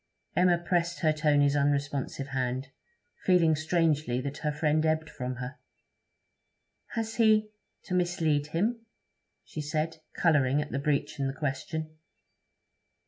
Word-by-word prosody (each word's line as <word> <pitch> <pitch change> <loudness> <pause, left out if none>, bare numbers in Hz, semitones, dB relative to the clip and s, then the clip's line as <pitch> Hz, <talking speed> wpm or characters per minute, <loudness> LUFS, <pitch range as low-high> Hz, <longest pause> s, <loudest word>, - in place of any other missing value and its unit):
Emma 175 +1 +4
pressed 170 0 -1
her 155 -1 +3
Tony's 145 -2 +3
unresponsive 140 -1 0
hand, 130 0 -2 0.5
feeling 170 -4 +4
strangely 155 -5 +1
that 140 +2 -5
her 150 - -1
friend 150 +1 +1
ebbed 160 0 +1
from 125 -1 -4
her. 125 +3 -7 1.4
'Has 225 -1 -3
he... 215 -2 +4 0.3
to - - -6
mislead 165 -5 +1
him?' 220 +9 -1 0.6
she 155 - -6
said, 155 +2 -2 0.2
colouring 145 -5 +3
at 150 0 -3
the 140 - -1
breach 145 +1 -1
in 135 - +1
the 135 - -2
question. 155 +2 -4
155 Hz, 130 wpm, -29 LUFS, 140-170 Hz, 1.4 s, Emma